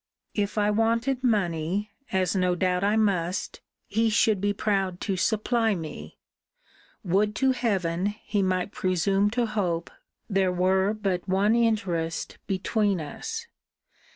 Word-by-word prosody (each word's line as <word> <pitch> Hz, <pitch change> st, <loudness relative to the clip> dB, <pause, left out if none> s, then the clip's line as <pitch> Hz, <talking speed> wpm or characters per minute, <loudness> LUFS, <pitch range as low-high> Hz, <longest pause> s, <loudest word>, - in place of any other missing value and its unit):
'If 205 Hz, 0 st, -2 dB
I 210 Hz, 0 st, +3 dB
wanted 230 Hz, +4 st, +1 dB
money, 195 Hz, -3 st, 0 dB, 0.2 s
as 190 Hz, -2 st, +1 dB
no 180 Hz, -1 st, +2 dB
doubt 180 Hz, +1 st, 0 dB
I 205 Hz, +2 st, +3 dB
must, 185 Hz, -5 st, 0 dB, 0.3 s
he 225 Hz, +2 st, +1 dB
should 210 Hz, -2 st, +3 dB
be 205 Hz, 0 st, +2 dB
proud 195 Hz, -3 st, -1 dB
to 195 Hz, -, -1 dB
supply 220 Hz, +3 st, +1 dB
me: 150 Hz, -, -7 dB, 0.9 s
Would 205 Hz, +3 st, +1 dB
to 265 Hz, +2 st, +3 dB
heaven, 195 Hz, -8 st, 0 dB, 0.2 s
he 205 Hz, -, 0 dB
might 185 Hz, 0 st, 0 dB
presume 195 Hz, +2 st, +1 dB
to 240 Hz, +2 st, 0 dB
hope, 180 Hz, -6 st, -2 dB, 0.4 s
there 195 Hz, -3 st, +2 dB
were 190 Hz, +3 st, +2 dB
but 195 Hz, -3 st, -2 dB
one 200 Hz, +3 st, +3 dB
interest 195 Hz, -8 st, 0 dB
between 200 Hz, 0 st, 0 dB
us!' 150 Hz, -2 st, -5 dB
195 Hz, 130 wpm, -26 LUFS, 180-215 Hz, 0.9 s, I